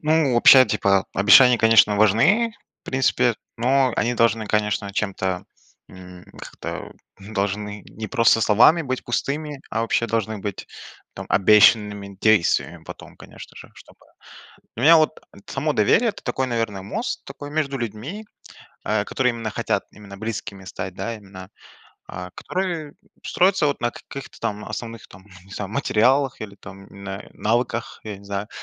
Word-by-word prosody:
Ну, 155 -4 +2
вообще, 130 +2 +8
типа, 100 -4 +1
э, - - -5
обещания, 120 +5 +7
конечно, 110 -2 +5
важны, 150 - +3 0.3
в - - -71
принципе, 125 -2 +1 0.2
но 130 +2 +2
они 120 +1 0
должны, 115 -2 +1
конечно, 105 -1 -1
чем-то, 95 -3 -2 0.4
м, 90 -1 -13
как-то - - -8 0.3
должны 105 0 -4
не 110 +1 -7
просто 115 -1 +3
словами 120 +11 +5
быть 130 -3 -4
пустыми, 145 +4 -3
а 115 - -1
вообще 115 0 0
должны 110 -2 -2
быть 100 -1 -6 0.5
там - - -8
обещанными 105 -1 +4
действиями 110 -6 +2
потом, - - -11
конечно - - -13
же, - - -12
чтобы - - -18 0.8
Для 115 - -4
меня 165 +3 +8
вот 155 0 +1 0.3
само 150 +3 -1
доверие- 170 - +3
это 205 - -8
такой, 130 0 -2
наверное, 115 -5 -2
мост 225 - -4
такой 145 +1 -9
между 145 -3 -1
людьми, 120 - -6 0.6
э, 105 -1 0
который 125 -1 0
именно 115 -2 -5
хотят - - -2
именно 100 -2 -13
близкими 105 -3 -6
стать, 95 0 -6
да, 115 +4 -4
именно. 95 -3 -12 0.6
Э, 90 0 -7
которые 170 -6 -4 0.3
строятся 185 -2 +2
вот 145 - -2
на 120 - 0
каких-то 140 +2 -11
там 105 0 -3
основных 115 +1 -7
там, 95 +1 -16 0.2
не 95 - -20
знаю, 100 -1 -6
материалах 130 +2 +1
или 100 -2 -9
там 100 0 -13
на 100 0 -8
навыках, 115 +1 -2
я 105 -3 -7
не 100 - -17
знаю. 100 +2 -4
110 Hz, 155 wpm, -22 LUFS, 100-135 Hz, 0.8 s, вообще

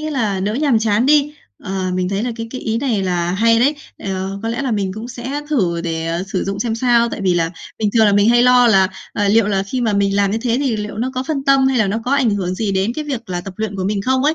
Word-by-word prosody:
nghĩa 310 0 -4
là 215 -9 -1
đỡ 205 +3 -1
nhàm 275 -4 +2
chán 220 +3 +1
đi. 295 0 +3 0.3
Ờ, 190 -1 -2
mình 185 0 -1
thấy 200 +2 -2
là 245 -1 -2
cái 230 0 -5
cái 255 - -6
ý 220 0 -2
này 235 -7 0
là 175 -2 -1
hay 230 +3 +3
đấy. 285 +4 +3 0.2
Ờ, 195 0 -4
có 225 - -2
lẽ 240 +4 -2
là 260 - -1
mình 195 -3 -1
cũng 220 +4 -7
sẽ 255 +4 -5
thử 180 - +1
để, 165 -1 -3
ờ, 170 +2 -2
sử 185 - -1
dụng 195 +1 -3
xem 225 -1 -1
sao, 235 0 +2
tại 220 - -6
vì 185 -2 +1
là 165 -1 0 0.3
bình 210 -2 0
thường 220 -2 +5
là 205 - +3
mình 205 +2 +4
hay 240 0 +5
lo 250 -1 +5
là, 190 -4 +4 0.2
à, 205 -1 0
liệu 220 0 +4
là 195 -2 0
khi 250 +6 -4
mà 225 -3 +1
mình 200 0 +1
làm 200 -1 +2
như 220 - -1
thế 235 0 0
thì 260 -6 0
liệu 210 0 -5
nó 255 +3 -1
có 255 - -1
phân 275 -1 -3
tâm 275 -1 +4
hay 260 -2 +1
là 215 - +3
nó 210 +4 -1
có 250 - -2
ảnh 265 -5 +3
hưởng 185 -3 -2
gì 205 -1 -2
đến 195 +4 0
cái 305 - -4
việc 255 -8 -5
là 175 0 -2
tập 190 0 -9
luyện 215 -2 -3
của 185 - -3
mình 200 0 -1
không 260 +3 +1
ấy. 310 +2 +3
220 Hz, 305 wpm, -18 LUFS, 195-250 Hz, 0.3 s, thường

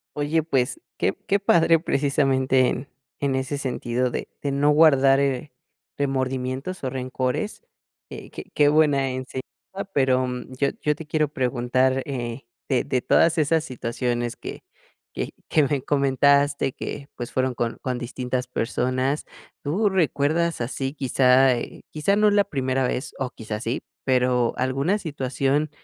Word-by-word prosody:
Oye, 150 +2 +1
pues, 150 - 0 0.2
qué - - +1
qué 200 +1 +3
padre. 165 -4 +4
Precisamente 135 -4 +2
en 130 +3 -3 0.3
en 140 -2 0
ese 130 +2 -2
sentido 125 -2 -1
de - - -4
de 140 - -1
no 140 +2 +2
guardar, 140 -3 +5
eh, 140 0 -1 0.5
remordimientos 135 +4 -2
o 130 - -1
rencores, 130 - -3 0.5
eh, - - -9
qué - - -7
qué 145 -1 +4
buena 145 -3 +3
enseñanza. 130 0 -5 0.5
Pero 130 -2 +2 0.3
yo 140 - +3
yo 150 0 +1
te 160 +1 -9
quiero 155 -1 +1
preguntar, 130 -1 +1
eh, 120 -2 -5 0.2
de 130 -3 +1
de 125 - -1
todas 165 +6 +3
esas 155 +1 +2
situaciones 120 -3 -2
que - - -8 0.5
que - - -3 0.2
que 155 - +3
me 140 -1 0
comentaste 140 0 +2
que, 140 - -6
pues, 120 -1 -6
fueron 130 0 0
con 120 -1 -2
con 125 -2 -2
distintas 125 +1 -3
personas, 130 +3 -1 0.4
¿tú 195 +9 +1
recuerdas 165 -2 +1
así, 135 +3 -3
quizá, 130 -2 +4
eh, 120 - -6
quizá 155 +6 +1
no 210 0 +4
es 205 - +1
la 205 -1 +4
primera 130 -6 0
vez 130 - -3
o 135 -2 -1
quizá 110 -3 -6
sí, 115 +2 -2 0.2
pero, 125 -2 +2
alguna 135 +9 +1
situación 140 -3 -1
135 Hz, 150 wpm, -24 LUFS, 130-150 Hz, 0.5 s, guardar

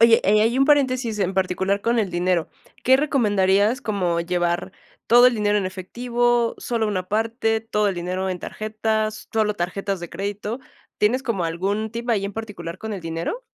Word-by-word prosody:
Oye, 230 0 +7
eh, 210 +2 +4
ahí 235 +4 +2
un 270 - +5
paréntesis, 255 -6 +2
en 190 -1 0
particular 190 +1 0
con 235 +2 +1
el 200 -4 0
dinero. 175 -1 0 0.3
¿Qué 260 +1 +6
recomendarías? 210 -4 +2
Como 185 -8 0
llevar 175 0 -1 0.3
¿Todo 245 +2 +7
el 250 - -2
dinero 210 0 +2
en 200 -2 0
efectivo, 240 +5 0
sólo 230 -3 -1
una 185 -3 -3
parte, 225 +1 0
todo 210 -1 0
el 195 - 0
dinero 185 +2 -3
en 180 -2 -3
tarjetas, 215 0 -2
sólo 215 -1 +1
tarjetas 195 +1 -3
de 175 - -7
crédito? 205 +5 -4 0.4
¿Tienes 245 +6 +2
como, 225 -9 -1
algún 195 +6 -1
tip 235 +1 -3
ahí, 200 -3 +1
en 200 - -4
particular 195 -6 -6
con 220 +1 -5
el 200 - -5
dinero? 165 - -4
210 Hz, 180 wpm, -23 LUFS, 185-230 Hz, 0.4 s, Oye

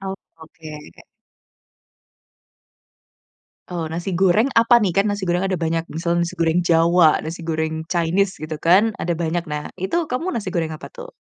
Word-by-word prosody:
Oh, 195 0 -4 0.2
oke. 160 -1 -12 3.0
Oh, 165 -3 -4
nasi 175 +3 -4
goreng 190 +6 +3
apa 230 +1 +5
nih? 200 -7 +1
Kan 195 +3 +2
nasi 205 -1 -3
goreng 175 +1 0
ada 190 -2 -1
banyak, 165 0 -2
misalnya 170 +2 -1
nasi 170 +1 -4
goreng 165 +1 +2
jawa, 170 -1 +4
nasi 165 +2 -6
goreng 160 -1 -2
chinese 185 +3 0
gitu 155 0 -5
kan 200 +6 +4
ada 170 +1 -1
banyak. 170 0 -1
Nah, 150 0 -3 0.2
itu 335 - 0
kamu 295 +8 -3
nasi 205 - -4
goreng 165 -2 -1
apa - - -11
tuh? - - -9
175 Hz, 160 wpm, -21 LUFS, 165-195 Hz, 3.0 s, apa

